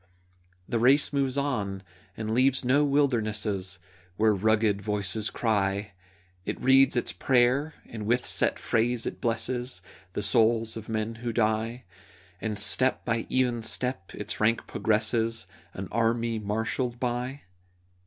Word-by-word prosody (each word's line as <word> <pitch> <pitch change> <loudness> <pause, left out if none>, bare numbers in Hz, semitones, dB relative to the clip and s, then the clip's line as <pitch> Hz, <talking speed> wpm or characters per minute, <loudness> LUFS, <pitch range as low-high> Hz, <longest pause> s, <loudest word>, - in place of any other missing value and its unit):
The 115 - -1
race 135 +5 +4
moves 135 -1 0
on, 105 -9 -2 0.3
and 110 0 -3
leaves 130 +1 +3
no 140 +4 +4
wildernesses 110 -9 0 0.4
Where 110 0 +4
rugged 105 0 +2
voices 105 0 0
cry; 100 -3 -1 0.5
It - - -4
reads 135 +1 +5
its 120 - 0
prayer, 130 +4 +2
and 110 -2 -7
with 120 +2 +1
set - - +2
phrase 120 +1 0
it - - -5
blesses 120 -2 -1 0.3
The 105 - -3
souls 115 0 +2
of 110 -1 -8
men 110 0 -2
who 120 -1 -2
die, 110 +2 0 0.6
And 110 -2 -3
step 130 +5 +1
by 115 -1 -1
even 125 -2 +1
step 120 -2 -2
its - - -4
rank 110 +2 +2
progresses, 110 -1 0 0.3
An 95 0 -5
army 115 0 0
marshalled 110 +4 -2
by. 125 +3 -3
115 Hz, 135 wpm, -27 LUFS, 110-125 Hz, 0.6 s, reads